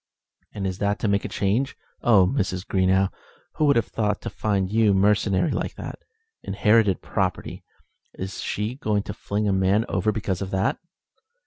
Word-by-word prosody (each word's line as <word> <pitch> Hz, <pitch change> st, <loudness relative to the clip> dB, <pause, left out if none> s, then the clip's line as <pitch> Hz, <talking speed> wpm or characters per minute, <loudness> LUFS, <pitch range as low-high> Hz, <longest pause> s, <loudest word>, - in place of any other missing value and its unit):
"And 100 Hz, -2 st, -5 dB
is 95 Hz, 0 st, -3 dB
that 100 Hz, 0 st, +1 dB
to -, -, -1 dB
make 100 Hz, 0 st, +1 dB
a -, -, -3 dB
change? 110 Hz, +8 st, 0 dB, 0.2 s
Oh! 105 Hz, -6 st, +5 dB
Mrs. 95 Hz, -5 st, -1 dB
Greenow, 95 Hz, 0 st, +2 dB, 0.5 s
who 155 Hz, -, +3 dB
would 140 Hz, -1 st, +4 dB
have 115 Hz, -, +2 dB
thought 105 Hz, -2 st, -1 dB
to -, -, -5 dB
find 100 Hz, -3 st, 0 dB
you 110 Hz, -2 st, +4 dB
mercenary 105 Hz, -, +2 dB
like -, -, -3 dB
that? -, -, -7 dB, 0.4 s
Inherited 105 Hz, 0 st, +2 dB
property! -, -, -2 dB, 0.5 s
Is 95 Hz, +1 st, -5 dB
she 105 Hz, +3 st, -2 dB
going 105 Hz, -6 st, -1 dB
to -, -, -6 dB
fling 105 Hz, +1 st, -2 dB
a 100 Hz, -, +2 dB
man 95 Hz, +4 st, +2 dB
over 110 Hz, -, 0 dB
because 100 Hz, -3 st, -2 dB
of 95 Hz, -, -3 dB
that?" 95 Hz, +2 st, 0 dB
100 Hz, 175 wpm, -24 LUFS, 95-110 Hz, 0.5 s, Oh